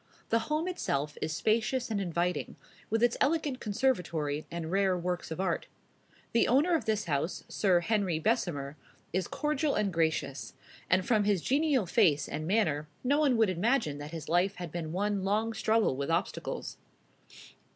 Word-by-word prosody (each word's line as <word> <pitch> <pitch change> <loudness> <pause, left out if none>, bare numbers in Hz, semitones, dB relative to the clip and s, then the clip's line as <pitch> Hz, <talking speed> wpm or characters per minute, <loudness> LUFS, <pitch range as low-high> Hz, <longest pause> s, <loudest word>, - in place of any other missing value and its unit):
The 230 - +3
home 310 +3 0
itself 150 - -2
is 155 - -1
spacious 225 +7 0
and 205 -2 0
inviting, 175 0 -1 0.3
with 225 +2 +1
its 240 -1 +3
elegant 295 -3 +1
conservatory 175 - -1
and 170 -1 -5
rare 195 -1 +2
works 180 0 -3
of 160 - -5
art. 190 -1 -1 0.6
The 235 - +3
owner 290 +9 +3
of 315 -9 +1
this 215 -2 0
house, 155 +2 -1
Sir 185 -4 +2
Henry 200 -5 +1
Bessemer, 155 - -1 0.4
is 185 0 0
cordial 300 -1 0
and 200 -3 0
gracious; 160 -4 -1 0.4
and 185 +1 +3
from 215 -4 +2
his 200 -5 +1
genial 280 -4 +2
face 170 -6 +3
and 155 +1 -4
manner, 160 -8 +1 0.2
no 280 +4 +2
one 275 -6 +3
would 220 -4 +3
imagine 185 - 0
that 145 +1 -6
his 165 -1 -7
life 180 +4 +2
had 175 -3 -6
been 165 -2 -4
one 200 +2 -1
long 215 +3 0
struggle 220 -7 +2
with 140 +2 -3
obstacles. 165 +2 -2
195 Hz, 165 wpm, -30 LUFS, 165-230 Hz, 0.6 s, The